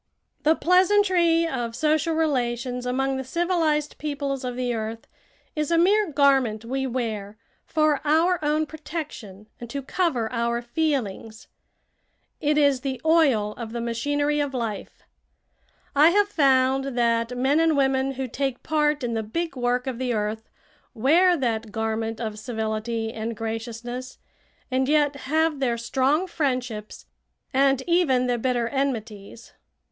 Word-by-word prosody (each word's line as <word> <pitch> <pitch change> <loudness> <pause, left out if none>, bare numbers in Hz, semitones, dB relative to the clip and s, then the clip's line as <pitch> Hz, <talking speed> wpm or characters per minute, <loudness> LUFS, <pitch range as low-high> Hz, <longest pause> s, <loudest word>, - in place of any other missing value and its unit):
The 315 +2 +4
pleasantry 360 -2 +3
of 240 -6 -3
social 310 +3 +1
relations 250 -5 -1
among 270 +2 0
the 265 - -3
civilized 315 0 0
peoples 280 -3 -3
of 250 -1 -3
the 250 -1 -1
earth 225 0 -5 0.5
is 300 -1 -1
a 335 - +3
mere 395 +2 +3
garment 270 -6 +2
we 265 +2 -2
wear 220 -5 -4 0.3
for 305 -2 +2
our 320 +3 +2
own 305 +1 +1
protection 295 - -7
and 240 - -8
to 275 +3 -4
cover 270 -7 0
our 235 0 0
feelings. 235 -6 -3 0.9
It 300 -1 +1
is 280 -3 +3
the 265 -1 -3
oil 280 -11 +3
of 230 -2 -6
the 240 - -3
machinery 290 +6 0
of 285 -2 -2
life. 225 -4 -5 0.9
I 300 +3 +7
have 405 +3 +3
found 270 -5 +2
that 235 0 +1
men 270 +5 +2
and 325 -2 +3
women 270 0 +1
who 265 0 -4
take 270 +1 -3
part 300 -2 +1
in 235 -1 -1
the 225 - -1
big 320 +9 -4
work 250 0 0
of 255 -3 -4
the 250 -2 -1
earth 215 +1 -3 0.5
wear 340 +10 +4
that 230 -5 -2
garment 220 0 -2
of 215 -2 -4
civility 225 0 -3
and 225 0 -4
graciousness, 230 +3 -5 0.5
and 260 +1 +1
yet 295 -1 +3
have 315 0 +1
their 240 -3 0
strong 270 +8 +1
friendships 250 - -3 0.5
and 270 0 +3
even 335 -8 +2
their 245 -1 0
bitter 245 -1 0
enmities. 230 -5 -4
265 Hz, 140 wpm, -24 LUFS, 235-300 Hz, 0.9 s, I